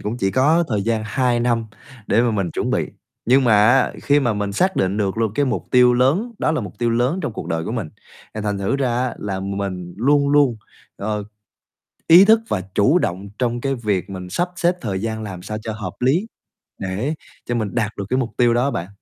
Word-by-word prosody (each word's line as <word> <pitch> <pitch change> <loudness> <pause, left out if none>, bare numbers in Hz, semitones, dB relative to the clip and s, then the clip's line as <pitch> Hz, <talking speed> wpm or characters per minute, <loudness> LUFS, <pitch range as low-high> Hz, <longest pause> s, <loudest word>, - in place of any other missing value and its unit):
cũng 105 +3 -3
chỉ 95 -5 0
có 155 - +3
thời 105 -4 0
gian 110 0 0
2 125 0 +1
năm 120 -2 0 0.4
để 110 - +3
mà 120 - +2
mình 100 -5 -1
chuẩn - - -2
bị. - - -1 0.3
Nhưng 130 +3 +4
mà 120 - +4 0.2
á, 130 +1 +3
khi 145 0 +3
mà 120 -4 +1
mình 105 -1 -3
xác 185 - +1
định 95 +2 +1
được 100 0 -1
luôn 110 -3 0
cái 145 - +2
mục 130 - -2
tiêu 125 -1 +5
lớn, 155 - +2
đó 160 - +1
là 155 - 0
mục 105 - -8
tiêu 120 -1 +1
lớn 125 +9 +1
trong 135 -7 -3
cuộc - - -7
đời 80 0 -2
của - - -4
mình, 110 -10 -3 0.5
thì 110 - -4
thành 105 -1 -2
thử 100 +8 0
ra 135 -3 0 0.2
á, 120 - -4
là 95 -2 -4
mình 95 -3 -4
luôn 140 +5 +3
luôn, 140 -5 +4 0.4
ờ, 105 0 -3 0.8
ý 175 +4 +9
thức 220 +2 +5
và 95 - -1
chủ 135 - +4
động 95 - -3
trong 120 -1 -1
cái 135 +1 -1
việc 100 -6 -2
mình 95 -1 -7
sắp 175 - 0
xếp 175 +1 +2
thời 100 - -3
gian 110 0 -3
làm 95 -4 -7
sao 105 +2 -5
cho 110 - -4
hợp 110 0 -6
lý 145 - +2 0.5
để 100 +11 -2 0.3
cho 120 - -2
mình 110 -2 -2
đạt 110 -3 0
được 100 - -4
cái 130 - +2
mục 120 -3 -1
tiêu 120 -1 +3
đó 125 +4 +2
bạn. 85 -4 -4
115 Hz, 235 wpm, -20 LUFS, 100-135 Hz, 0.8 s, ý